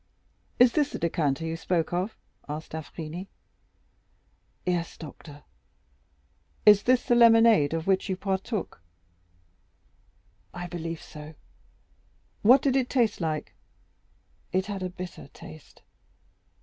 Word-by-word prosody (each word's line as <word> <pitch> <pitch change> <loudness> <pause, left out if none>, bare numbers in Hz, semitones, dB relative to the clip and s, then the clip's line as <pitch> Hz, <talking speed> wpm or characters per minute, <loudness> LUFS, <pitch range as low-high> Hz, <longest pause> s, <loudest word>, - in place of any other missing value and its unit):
"Is 245 0 +6
this 295 -2 +2
the - - -2
decanter 165 -3 -1
you 160 0 -2
spoke 165 0 -1
of?" 185 +5 -2 0.3
asked 150 +2 -6
d'Avrigny. 160 +3 -7 1.4
"Yes, 175 -2 -2
doctor." 150 -2 -11 1.2
"Is 210 -1 +8
this 250 +2 +3
the - - -19
same 240 0 +5
lemonade 225 -9 +6
of 165 0 -3
which 195 +1 +1
you 190 - -1
partook?" 195 - -3 1.7
"I 175 0 -5
believe 165 -2 -5
so." 150 +1 -11 1.1
"What 255 +6 +6
did 270 -2 +2
it 260 -2 +1
taste 230 -7 +1
like?" 155 -2 -3 1.0
"It 185 0 +1
had 200 -2 -5
a 185 - -2
bitter 180 -1 -9
taste." 80 0 -13
180 Hz, 120 wpm, -27 LUFS, 160-215 Hz, 1.7 s, Is